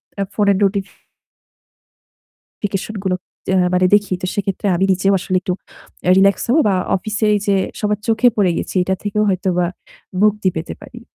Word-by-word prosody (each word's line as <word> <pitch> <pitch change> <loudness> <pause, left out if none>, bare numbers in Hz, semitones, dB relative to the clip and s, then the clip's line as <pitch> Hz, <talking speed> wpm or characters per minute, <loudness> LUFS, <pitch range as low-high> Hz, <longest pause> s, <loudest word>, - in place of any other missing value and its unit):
অ্যা 200 - -1
ফোনের 200 -2 +2 1.8
নোটিফিকেশন 205 +1 -5
গুলোতে 185 0 -4 0.2
মানে 185 0 +4
দেখি 205 -2 +2
তো - - -1
সেক্ষেত্রে 200 0 -2
আমি 190 - +1
নিজেও 190 +2 +2
আসলে 185 +1 -2
একটু 180 0 -2 0.5
অ্যা 180 - +4
রিল্যাক্স 195 +1 +3
হবো 290 +7 +4
বা 195 - +2 0.2
অফিসের 215 +3 -1
এই 205 - +1
যে 200 -1 +3 0.2
সবার 210 -1 0
চোখে 225 +2 +4
পড়ে 195 -4 +3
গেছি - - -5
এটা 190 +1 0
থেকেও 210 +1 0
হয়তোবা 185 -2 +1 0.6
মুক্তি 210 -2 +3
পেতে 160 - -4
পারি। 235 - -11
200 Hz, 155 wpm, -18 LUFS, 185-210 Hz, 1.8 s, মানে